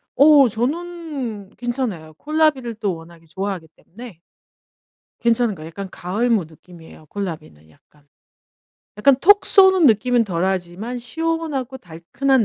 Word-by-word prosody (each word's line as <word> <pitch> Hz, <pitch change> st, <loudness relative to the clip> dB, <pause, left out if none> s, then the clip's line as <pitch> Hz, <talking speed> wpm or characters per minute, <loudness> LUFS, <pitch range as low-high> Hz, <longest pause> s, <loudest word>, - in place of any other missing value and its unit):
어 285 Hz, -1 st, +7 dB
저는 270 Hz, -, -4 dB
괜찮아요. 235 Hz, -11 st, -4 dB
콜라비를 295 Hz, -, 0 dB
또 205 Hz, -4 st, -2 dB
워낙에 165 Hz, 0 st, -15 dB
좋아하기 185 Hz, +1 st, -5 dB
때문에 220 Hz, -3 st, -13 dB, 1.0 s
괜찮은 235 Hz, -2 st, +2 dB
거예요. 155 Hz, -2 st, -10 dB
약간 190 Hz, +4 st, -8 dB
가을 205 Hz, +8 st, -2 dB
무 215 Hz, -7 st, +2 dB
느낌이에요 160 Hz, 0 st, -16 dB
콜라비는 150 Hz, -, -7 dB
약간. 145 Hz, -, -27 dB, 0.9 s
약간 270 Hz, +5 st, +5 dB
톡 405 Hz, +5 st, +5 dB
쏘는 380 Hz, -5 st, +6 dB
느낌은 235 Hz, +1 st, +3 dB
덜하지만 185 Hz, +5 st, -3 dB
시원하고 290 Hz, 0 st, -3 dB
달큼한 225 Hz, +8 st, -1 dB
225 Hz, 305 characters per minute, -20 LUFS, 175-270 Hz, 1.0 s, 어